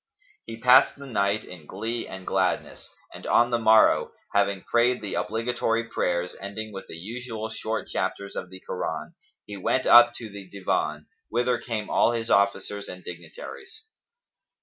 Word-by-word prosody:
He 115 0 -6
passed 125 +3 +6
the 140 - -10
night 105 -4 0
in 80 -5 -12
glee 115 +5 -4
and 95 -1 -9
gladness, 95 -1 -1 0.2
and - - -9
on 120 +1 +4
the 120 - +2
morrow, 110 -1 +5 0.2
having 100 -1 +1
prayed 120 +1 +2
the 105 -3 -5
obligatory 115 +1 0
prayers 90 -6 -1
ending 105 +2 -6
with 95 - -8
the - - -8
usual 110 +4 -6
short 110 0 -3
chapters[FN#277] 100 +1 -3
of 90 - -15
the 95 0 -11
Koran, - - -4 0.3
he 105 -1 -8
went 130 +7 0
up 120 0 +8
to 115 - -6
the 100 -2 -10
Divan, 75 -6 -2 0.2
whither 120 +1 +1
came 110 -4 -4
all 120 - +4
his 115 -1 -3
officers 100 0 +1
and 90 0 -9
dignitaries. 85 - -10
110 Hz, 160 wpm, -26 LUFS, 95-120 Hz, 0.3 s, up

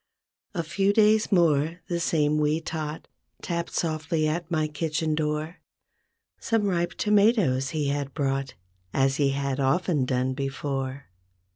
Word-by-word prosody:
A 170 - -1
few 195 +5 +1
days 215 0 +4
more, 165 -2 +3
the 170 -1 -1
same 150 -2 +1
wee 150 +1 +2
tot 160 -1 -5 0.4
Tapped 170 -1 -3
softly 155 -1 0
at 165 +2 -2
my 155 -3 +1
kitchen 155 +1 -1
door. 155 +2 -2 0.8
Some 225 -4 0
ripe 175 -3 0
tomatoes 205 - +3
he 150 -3 -1
had 140 -1 -3
brought 135 -2 -1 0.4
As 135 0 +2
he 140 -2 +3
had 140 0 -2
often 140 +1 +1
done 130 0 0
before. 135 0 -3
155 Hz, 135 wpm, -26 LUFS, 140-170 Hz, 0.8 s, days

